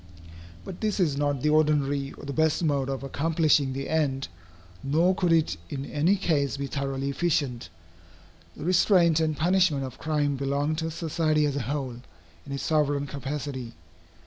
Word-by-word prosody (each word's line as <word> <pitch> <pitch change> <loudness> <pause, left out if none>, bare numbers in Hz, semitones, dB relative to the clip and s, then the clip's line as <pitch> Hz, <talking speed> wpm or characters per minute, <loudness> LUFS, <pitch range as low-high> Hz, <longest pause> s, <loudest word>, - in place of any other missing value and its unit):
But 175 - -8
this 215 -2 -1
is 160 -7 +2
not 145 -2 -1
the 150 - +3
ordinary 145 -3 +2
or - - -11
the 140 - -4
best 160 +3 +1
mode 140 -4 +1
of 135 0 -3
accomplishing 150 -1 +1
the 135 +1 -4
end, 140 -4 0 0.5
nor 160 +7 +2
could 180 -2 0
it 165 -2 +2
in 135 -1 -4
any 160 +8 +2
case 150 -8 0
be 140 - -3
thoroughly 135 0 -2
efficient. 140 - -1 0.9
The - - -6
restraint 175 -2 +4
and 155 -2 0
punishment 175 -4 +2
of 130 -2 -7
crime 145 -3 0
belong 140 +3 0
to 160 0 -2
society 160 -2 0
as 145 -2 -1
a 140 - -1
whole, 130 -4 -3 0.5
in - - -8
its 140 -1 -3
sovereign 145 -2 +1
capacity. 140 -3 -5
145 Hz, 165 wpm, -26 LUFS, 140-160 Hz, 0.9 s, restraint